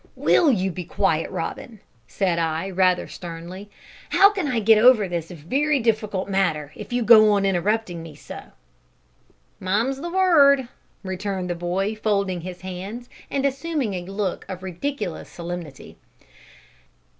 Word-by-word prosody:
"Will 315 -5 +4
you 190 -5 0
be 180 +1 -6
quiet, - - 0
Robin?" 225 -4 -6 0.3
said 175 +4 0
I, 165 +3 -1
rather 185 -1 +2
sternly; 175 +4 -9 0.4
"how 400 +1 +6
can 380 -7 -2
I 250 -5 0
get 220 0 +5
over 230 -3 +6
this 170 -2 -4
very 270 - 0
difficult 215 -5 -1
matter 160 -7 0
if - - -9
you 245 0 0
go 215 -1 +7
on 200 -1 +1
interrupting 195 -1 0
me 165 -2 -10
so?" - - -10 1.1
"Mum's 230 +9 -1
the 345 - -4
word!" 295 -8 +4 0.4
returned 190 -1 -3
the - - -2
boy, 180 +4 -1
folding 200 -4 -1
his 180 +1 -8
hands, 195 +6 -7 0.2
and 275 0 -1
assuming 275 -4 -1
a 180 - -3
look 195 0 -3
of 185 -1 -7
ridiculous 190 - -4
solemnity. 170 -5 -8
195 Hz, 145 wpm, -23 LUFS, 180-240 Hz, 1.1 s, go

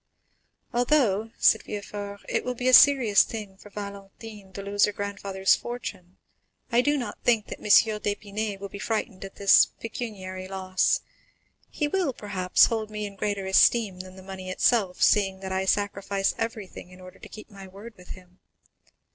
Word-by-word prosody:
"Although," 240 -4 +2
said 220 - +4
Villefort, 205 -1 -7
"it - - -1
will 250 0 -3
be 250 +1 -3
a 255 - +3
serious 255 -8 +7
thing 210 -4 -5
for 205 - -15
Valentine 200 0 -10
to 200 - -7
lose 200 +1 +2
her 210 - -2
grandfather's 200 -1 0
fortune, 195 -7 -8 0.5
I 235 +1 +4
do 290 +3 +1
not 245 - -5
think 225 -3 +2
that - - -8
M. - - -14 0.3
d'Épinay 205 0 -3
will 200 - -6
be 200 +1 -10
frightened 215 -2 -3
at 195 - -9
this 200 -1 +5
pecuniary 190 -5 -6
loss. 185 -1 0 0.7
He 295 - -2
will, 345 -3 -1
perhaps, 190 -5 +2
hold 220 -2 -3
me 210 0 -5
in 200 -1 -8
greater 200 0 -3
esteem 190 0 +3
than 185 0 -10
the 190 - -13
money 190 -1 -8
itself, 190 -1 +1
seeing 195 -2 +3
that 190 -1 -6
I 190 0 -1
sacrifice 200 0 0
everything 220 -5 -6
in 180 0 -15
order 185 0 -13
to - - -12
keep 215 +1 -12
my 195 -1 -11
word 200 +5 -12
with 180 -1 -17
him. 180 0 -20
200 Hz, 170 wpm, -26 LUFS, 190-220 Hz, 0.7 s, serious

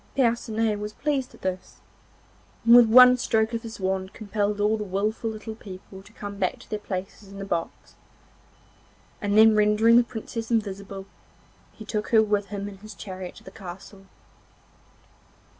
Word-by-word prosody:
Percinet 225 -4 +1
was 210 0 -5
pleased 280 -2 -2
at - - -21
this, 185 -1 -4 0.9
and 235 +1 +8
with 240 -2 +8
one 250 +2 +8
stroke 220 -1 +1
of 230 - -2
his 225 -2 -9
wand 190 0 -2
compelled 205 -1 -2
all 210 +1 +2
the 215 - -4
wilful 210 +3 -2
little 220 0 -7
people 190 -2 -11
to 205 - -18
come 205 -2 -8
back 185 - 0
to - - -17
their 215 - -2
places 195 0 -6
in 200 - -10
the 195 - -5
box, 170 -4 -4 1.3
and 205 0 +1
then 220 0 +7
rendering 210 +2 +5
the 245 - +6
Princess 230 -1 -6
invisible 200 -3 -3 0.7
he 220 - -12
took 210 0 -3
her 220 -2 +5
with 205 -1 0
him 200 0 -5
in 200 -1 -9
his 215 0 -11
chariot 185 -3 -8
to - - -15
the 190 - -11
castle. 195 +1 -11
210 Hz, 170 wpm, -25 LUFS, 195-225 Hz, 1.3 s, and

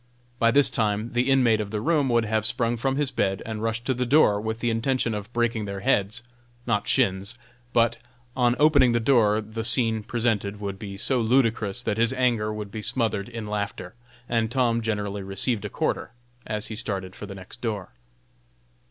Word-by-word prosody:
By 115 - +4
this 140 +3 +4
time 110 0 0
the 125 +2 +1
inmate 120 -5 +4
of 105 - -5
the 105 0 -3
room 150 +1 +1
would 120 -1 +2
have 110 0 0
sprung 115 +1 +1
from 135 +3 -1
his 145 -1 -1
bed, 95 -6 -1
and 110 -1 -5
rushed 115 +1 -2
to 130 - +1
the 125 0 -1
door, 120 -6 +4
with 110 +1 -3
the 120 -1 0
intention 115 +1 0
of 105 +1 -6
breaking 120 -2 0
their 100 -1 -5
heads 105 +4 0 0.4
not 105 -4 0
shins 100 -3 +1 0.4
but, 115 0 +2 0.4
on 120 -2 +2
opening 140 -5 +5
the 120 - +2
door, 110 -4 +3
the 110 +1 -6
scene 115 -1 +4
presented 105 -3 -1
would 100 -2 -5
be 100 -3 -7
so 125 +5 +3
ludicrous 115 -2 +1
that 105 - -1
his 115 +2 +2
anger 120 -5 +1
would 105 -1 -6
be 110 - -5
smothered 110 -3 -1
in 115 -2 -6
laughter, 100 -3 -4 0.3
and 115 -2 0
Tom 120 -2 +1
generally 105 -2 -2
received 100 +3 0
a - - -3
quarter, 110 - -2 0.3
as 105 -1 -2
he 110 - -5
started 95 -4 -4
for 105 - -8
the 100 - -8
next 95 +5 -12
door. 105 -6 -3
115 Hz, 195 wpm, -25 LUFS, 105-120 Hz, 0.4 s, opening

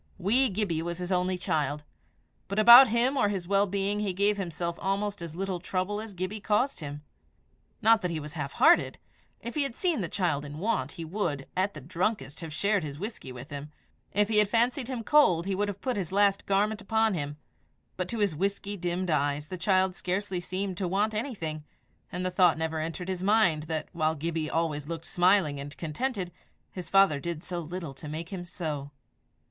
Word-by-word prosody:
Wee 235 +8 +3
Gibbie 190 -5 -1
was 170 0 -4
his 180 +1 -5
only 180 0 +1
child, 150 -4 -1 0.6
but 200 - -4
about 240 +4 +10
him 235 +4 +2
or 230 -7 +3
his 190 -4 -3
well 200 +1 +3
being 200 +2 -1
he 205 -3 -1
gave 205 +2 +2
himself 170 -2 -3
almost 200 0 -1
as 165 -2 -7
little 190 0 -2
trouble 185 +4 -2
as 220 -3 -9
Gibbie 185 +4 -3
caused 220 +7 +1
him! 145 -1 -7 0.8
Not 225 0 +6
that 180 - -1
he 165 -2 -2
was 150 0 -8
hard 145 -5 -4
hearted; 340 +2 +4 0.4
if 235 - -5
he 300 - 0
had 275 -4 -2
seen 345 - 0
the 170 - -3
child 175 -7 0
in 145 0 -8
want, 210 +5 -1
he 165 -3 -6
would, 160 -6 -2
at 190 0 0
the 155 - -8
drunkest, 175 - -2
have 165 -2 -6
shared 200 +4 +1
his 145 -2 -6
whisky 205 - -6
with 125 +4 -10
him; 145 +1 -7 0.4
if 205 +1 +2
he 215 -1 +3
had 210 -1 +4
fancied 240 +3 +2
him 250 -3 -4
cold, 185 - +4
he 195 - -1
would 205 +2 0
have 200 -1 -5
put 255 -4 -1
his 185 -4 -3
last 200 0 +2
garment 210 +2 +1
upon 220 +1 +2
him; 145 -3 -3 0.6
but 185 -1 -3
to 235 - -3
his 205 -5 +1
whisky 200 +4 -2
dimmed 180 -1 -2
eyes 145 0 0
the 185 - -4
child 185 0 +2
scarcely 190 0 -2
seemed 185 +1 -3
to 190 -2 -1
want 205 +4 +1
anything, 195 - -3 0.5
and 180 +1 -3
the 185 - 0
thought 180 -3 +4
never 160 0 -2
entered 165 +3 -4
his 185 -1 -3
mind 190 -6 +3
that, 160 -1 -2
while 155 -1 +1
Gibbie 160 0 -2
always 155 -3 -1
looked 165 0 -5
smiling 175 -5 +3
and 145 +1 -8
contented, 185 - -3 0.4
his 180 -3 -7
father 195 -7 +5
did 170 +2 -4
so 175 -1 -4
little 170 -2 -6
to 145 +3 -9
make 165 +3 -5
him 190 -3 -5
so. 155 -5 -4
185 Hz, 205 wpm, -28 LUFS, 160-205 Hz, 0.8 s, about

